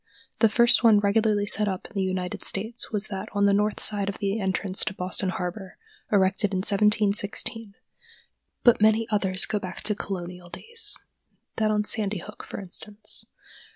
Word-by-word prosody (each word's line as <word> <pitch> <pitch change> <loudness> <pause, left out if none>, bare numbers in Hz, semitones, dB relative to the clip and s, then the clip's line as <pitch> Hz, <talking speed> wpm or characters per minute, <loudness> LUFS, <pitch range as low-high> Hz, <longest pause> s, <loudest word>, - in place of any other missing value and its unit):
The 225 - +5
first 235 +3 +4
one 220 -3 +6
regularly 205 0 +1
set 210 0 +3
up 190 -2 -4
in - - -13
the 195 - -1
United 185 -1 -3
States 220 +5 -2
was 210 -1 +2
that 195 -2 -6
on 200 -1 +2
the 200 - +4
north 210 +1 0
side 200 -2 +3
of 200 - -5
the 200 +2 -2
entrance 190 -1 -1
to 205 - -4
Boston 185 +1 -1
harbor, 185 +1 -5 0.3
erected 195 0 +2
in 185 0 -1
1716; 210 +1 +1 0.9
but 240 -4 +5
many 220 +1 +3
others 190 -2 +3
go 210 - -2
back 185 -2 -7
to 210 0 0
Colonial 180 -3 -7
days—that 420 - -3
on 210 0 +1
Sandy 210 -1 0
Hook, 205 +4 -10
for - - -8
instance. 205 +3 -7
205 Hz, 165 wpm, -25 LUFS, 190-215 Hz, 0.9 s, one